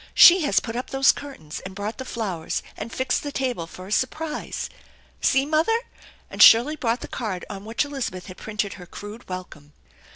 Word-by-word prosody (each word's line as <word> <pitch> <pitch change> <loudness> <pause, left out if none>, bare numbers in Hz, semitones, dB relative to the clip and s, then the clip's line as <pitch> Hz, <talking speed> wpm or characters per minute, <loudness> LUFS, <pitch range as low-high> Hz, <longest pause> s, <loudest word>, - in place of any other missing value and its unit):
She 355 +1 +9
has - - +4
put 225 -1 -6
up 250 +2 -4
those 270 0 +5
curtains, 165 - -8
and 190 0 -9
brought 205 +5 -4
the 260 - -5
flowers, 195 -10 -3
and 230 - -6
fixed 260 +2 0
the 290 - -5
table, 250 -12 -2
for 185 +2 -10
a 195 - -10
surprise. 305 +7 -2 0.5
See, 270 0 +3
mother! 315 +9 +2 0.3
" - - -24
and - - -2
Shirley 245 +7 +8
brought 235 -4 -1
the - - -6
card 200 -6 -4
on 200 0 -7
which 230 +6 0
Elizabeth 260 -11 -4
had 185 -2 -10
printed 210 -2 -3
her 180 - -11
crude 205 +5 -10
welcome. 155 -5 -8
230 Hz, 195 wpm, -24 LUFS, 190-270 Hz, 0.5 s, She